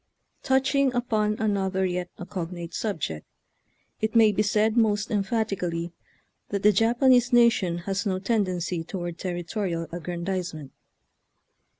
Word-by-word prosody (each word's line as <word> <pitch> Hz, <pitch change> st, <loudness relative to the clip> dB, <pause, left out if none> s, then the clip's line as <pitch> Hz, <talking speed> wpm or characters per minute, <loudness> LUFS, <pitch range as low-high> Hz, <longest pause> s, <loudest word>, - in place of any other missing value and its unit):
Touching 265 Hz, +1 st, +2 dB
upon 215 Hz, -3 st, +1 dB
another 195 Hz, -3 st, 0 dB
yet 180 Hz, -1 st, -2 dB
a 175 Hz, -, -7 dB
cognate 175 Hz, -3 st, -6 dB
subject, 155 Hz, -, -3 dB, 0.8 s
it 220 Hz, +1 st, -2 dB
may 220 Hz, -2 st, +6 dB
be 205 Hz, -, 0 dB
said 215 Hz, +1 st, +2 dB
most 220 Hz, -1 st, +2 dB
emphatically 195 Hz, -5 st, -1 dB, 0.6 s
that 200 Hz, -1 st, -2 dB
the 210 Hz, -, +7 dB
Japanese 245 Hz, +4 st, +4 dB
nation 235 Hz, -8 st, +4 dB
has 195 Hz, 0 st, -1 dB
no 190 Hz, -3 st, 0 dB
tendency 185 Hz, -5 st, -1 dB
toward 175 Hz, -1 st, -5 dB
territorial 175 Hz, -1 st, -3 dB
aggrandizement. 175 Hz, -3 st, -4 dB
195 Hz, 115 wpm, -26 LUFS, 175-220 Hz, 0.8 s, the